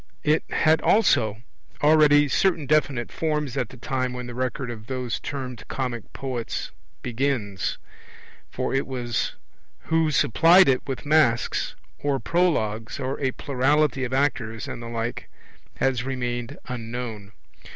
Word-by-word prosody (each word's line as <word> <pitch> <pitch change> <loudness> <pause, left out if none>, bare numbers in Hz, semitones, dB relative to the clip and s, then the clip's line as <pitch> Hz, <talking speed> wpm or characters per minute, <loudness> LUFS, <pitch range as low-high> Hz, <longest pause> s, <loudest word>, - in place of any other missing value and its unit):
It 155 +1 +3
had 160 0 +3
also 110 - +3 0.4
already 150 -1 +6
certain 165 +1 +2
definite 140 -4 +1
forms 150 -4 -1
at 125 -5 -1
the 130 - -12
time 130 0 -2
when 125 0 -5
the 120 - -7
record 125 0 -2
of 110 -2 -9
those 125 -2 -3
termed 125 -5 -5
comic 125 -4 -4
poets 125 -4 -4 0.3
begins. 120 -6 -1 0.8
Who - - -1
it 135 +1 0
was 120 -3 -2 0.6
who 160 -1 +3
supplied 165 - +5
it 130 -2 +3
with 135 0 -4
masks, 145 -6 +2 0.2
or 140 -2 0
prologues, 115 -12 0
or 135 0 -3
a 135 - +1
plurality 140 +1 +1
of 130 - -3
actors 125 -5 0
and - - -6
the 120 - -7
like, 115 0 -4 0.5
has 130 -3 +1
remained 125 0 -3
unknown. 115 -4 -5
130 Hz, 135 wpm, -25 LUFS, 120-145 Hz, 0.8 s, already